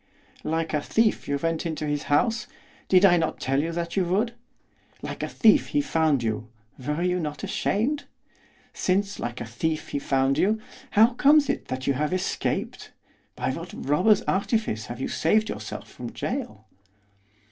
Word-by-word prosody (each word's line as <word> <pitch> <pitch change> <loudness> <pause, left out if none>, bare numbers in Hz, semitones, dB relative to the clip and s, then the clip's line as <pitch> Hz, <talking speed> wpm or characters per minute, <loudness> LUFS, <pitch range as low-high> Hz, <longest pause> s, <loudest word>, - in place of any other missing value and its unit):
'Like 160 0 -1
a 150 - +1
thief 220 +7 +1
you 140 - 0
went 165 +2 -1
into 160 -2 -3
his 145 -1 -2
house, 225 +9 +2 0.4
did 185 +1 +6
I 175 -2 +6
not 160 -2 -1
tell 135 +2 +1
you 165 +2 -2
that 170 0 -3
you 195 - +3
would? 210 +7 0 0.7
Like - - -5
a - - -2
thief 220 -2 +4
he 290 - +1
found 160 - +1
you, 110 0 -2 0.3
were 150 +6 -1
you 180 0 +1
not 150 0 -4
ashamed? 215 +7 0 0.7
Since, 195 +2 0
like 120 +1 -4
a - - -4
thief 155 +8 -2
he - - -2
found 135 0 +1
you, 215 +3 +2 0.4
how 225 +3 +7
comes 285 +2 +5
it - - -5
that 130 0 -4
you 140 - +2
have 150 +5 -1
escaped, 185 - -2 0.5
by - - -1
what - - -6
robber's 185 +9 +3
artifice 195 - 0
have 120 0 -7
you - - -2
saved 215 +7 +2
yourself - - -6
from - - -7
gaol? 235 - -4
170 Hz, 170 wpm, -25 LUFS, 145-215 Hz, 0.7 s, how